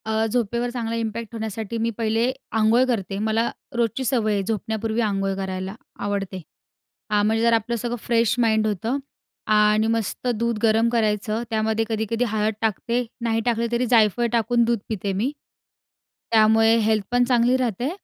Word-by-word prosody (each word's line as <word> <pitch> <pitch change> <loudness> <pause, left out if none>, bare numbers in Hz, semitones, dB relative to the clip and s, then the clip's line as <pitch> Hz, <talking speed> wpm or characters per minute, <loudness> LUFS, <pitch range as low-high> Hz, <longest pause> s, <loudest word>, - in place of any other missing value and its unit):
अ, 220 0 0
झोपेवर 235 +1 -1
चांगला 230 -2 -3
इम्पॅक्ट 230 0 -4
होण्यासाठी 220 0 -4
मी 230 +1 0
पहिले, 230 +2 +1 0.2
अंघोळ 225 +3 +3
करते 195 -5 -2
मला, 220 +2 +1 0.3
रोजची 235 +2 0
सवय 230 -4 +1
आहे 200 -1 0
झोपण्यापूर्वी 220 +1 -2
आंघोळ 195 -3 0
करायला, 190 0 -4 0.2
आवडते. 200 -2 -3 0.7
आ, 210 -1 +2
म्हणजे 220 +2 +1
जर 235 0 +4
आपलं 230 +1 +1
सगळं 240 +1 -3
फ्रेश 230 -2 +2
माइंड 220 -2 +2
होतं. 220 +6 -1 0.5
आणि 210 +1 +4
मस्त 225 +2 -2
दूध 235 +1 -1
गरम 225 +1 +3
करायचं, 215 -1 0
त्यामध्ये 220 0 0
कधी-कधी 225 +1 -1
हळद 215 0 0
टाकते 235 +3 0 0.2
नाही 225 -1 0
टाकले 235 -1 +1
तरी 240 +1 +1
जायफळ 230 0 +4
टाकून 235 +1 +2
दूध 235 -1 +1
पिते 200 -2 -2
मी. 220 +9 -1 1.0
त्यामुळे 225 0 +5
हेल्थ 215 -2 +1
पण 245 0 +3
चांगली 245 0 +3
राहते 245 0 -1
225 Hz, 155 wpm, -23 LUFS, 215-235 Hz, 1.0 s, त्यामुळे